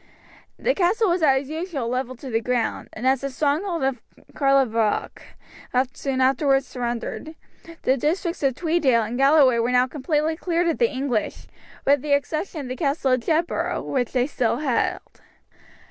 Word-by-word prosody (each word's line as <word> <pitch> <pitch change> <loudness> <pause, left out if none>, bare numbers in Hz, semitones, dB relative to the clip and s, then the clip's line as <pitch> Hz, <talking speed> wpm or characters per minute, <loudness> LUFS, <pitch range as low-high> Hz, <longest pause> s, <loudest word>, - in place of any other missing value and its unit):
The - - +1
castle 405 +3 +2
was 350 0 0
as 270 -3 +3
usual 315 -5 -4
levelled 255 +1 -3
to 265 - -7
the 225 0 +1
ground, 245 -1 -2
and 230 - -6
as 265 0 +3
the 275 - -2
stronghold 310 +5 -1
of 265 -3 -1 0.3
Carlaverock 255 -6 +1 0.7
soon 265 -2 -2
afterwards 270 +1 +3
surrendered, 245 +6 -5 0.5
the 265 - +2
districts 335 +6 -1
of 270 -3 +1
Tweeddale 300 -9 +2
and 230 +3 -5
Galloway 275 -2 +5
were 230 +1 +1
now 250 0 +4
completely 300 +3 -1
cleared 345 +1 0
of 330 - -2
the 470 -2 +3
English, 260 -5 -2 0.4
with 280 -1 +4
the 290 0 0
exception 310 +3 -1
of 270 - -7
the 255 - -3
Castle 275 -2 0
of 255 - +3
Jedburgh, 325 +7 -1
which 250 -3 -1
they 250 -1 +1
still 245 -4 0
held. 270 -4 -2
275 Hz, 160 wpm, -23 LUFS, 250-315 Hz, 0.7 s, Galloway